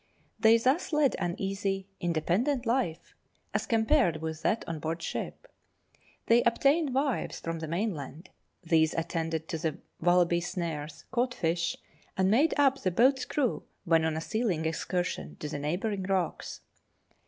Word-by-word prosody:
They 225 +1 +6
thus 260 +11 +1
led 295 -3 +3
an 175 0 -1
easy, 195 0 -2
independent 180 - 0
life, 230 -9 -1 0.4
as - - -1
compared 225 - +3
with 160 0 -5
that 225 - 0
on 165 -2 -4
board 165 +2 -3
ship. - - -5 0.8
They 235 +1 +5
obtained 275 +4 +2
wives 275 -1 0
from 165 0 -4
the 160 - -5
mainland; 165 -3 -4 0.3
these 160 -2 +3
attended 165 -1 -2
to 165 -4 -3
the 160 -1 -2 0.2
wallaby 175 0 +3
snares, 160 -4 -4
caught 245 0 0
fish, 170 0 0 0.4
and 190 0 +3
made 285 +9 +4
up 275 -2 +3
the 185 - +1
boat's 260 +8 +3
crew 270 -6 0 0.2
when 165 -2 +4
on 160 -1 0
a - - -2
sealing 195 -5 -1
excursion 160 - -2
to - - -6
the 145 -1 -4
neighbouring 190 +7 -2
rocks. 185 -2 -2
180 Hz, 150 wpm, -29 LUFS, 160-235 Hz, 0.8 s, They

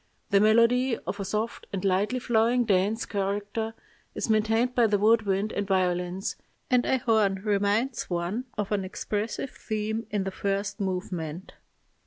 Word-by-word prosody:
The 200 - +6
melody, 230 +3 +4
of 190 +4 -6
a - - -1
soft 215 +4 -3
and 195 0 -3
lightly 195 +6 +1
flowing 240 0 +2
dance 205 +2 +1
character, 205 +3 -2 0.4
is 225 - -1
maintained 225 +3 +2
by 240 -2 +4
the 205 -1 +2
wood 220 +1 +3
wind 195 +2 0
and 200 -1 -2
violins, 180 -1 0 0.3
and 250 -1 +4
a 265 - +3
horn 220 -5 +2
reminds 210 +4 0
one 180 +8 -2
of 205 -1 -2
an 200 -2 +1
expressive 210 +6 -3
theme 220 +1 -3
in 205 -2 -1
the 195 - -3
first 195 +1 -2
movement. 180 -3 -4
210 Hz, 155 wpm, -27 LUFS, 195-225 Hz, 0.4 s, The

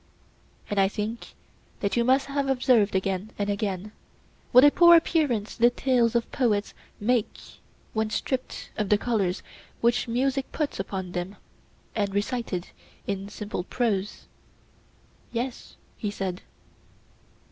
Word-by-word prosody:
And 205 - -1
I 195 - +5
think 215 +3 -5 0.5
that 200 -1 0
you 235 - +3
must 260 +3 +3
have 280 0 -1
observed 245 -6 +3
again 190 +2 -1
and 205 0 0
again 200 0 -3 0.6
what 250 +2 +8
a 290 - +8
poor 345 +1 +8
appearance 290 -11 0
the 240 +1 +5
tales 245 -2 +1
of 235 - 0
poets 220 -6 0 0.3
make 230 +1 +1 0.6
when 220 0 0
stripped 260 +3 -3
of 210 -2 0
the 210 - +5
colours 205 -5 -1 0.4
which 235 +1 +2
music 265 +3 0
puts 300 -8 -2
upon 190 -2 -4
them, 180 +3 -4 0.6
and 200 -2 -1
recited 205 -4 -2 0.4
in 200 0 -3
simple 205 -4 -5
prose. 205 -2 -2 1.1
Yes, 245 +1 -4 0.2
he 210 - -2
said. 190 -3 -4
215 Hz, 130 wpm, -26 LUFS, 200-250 Hz, 1.1 s, what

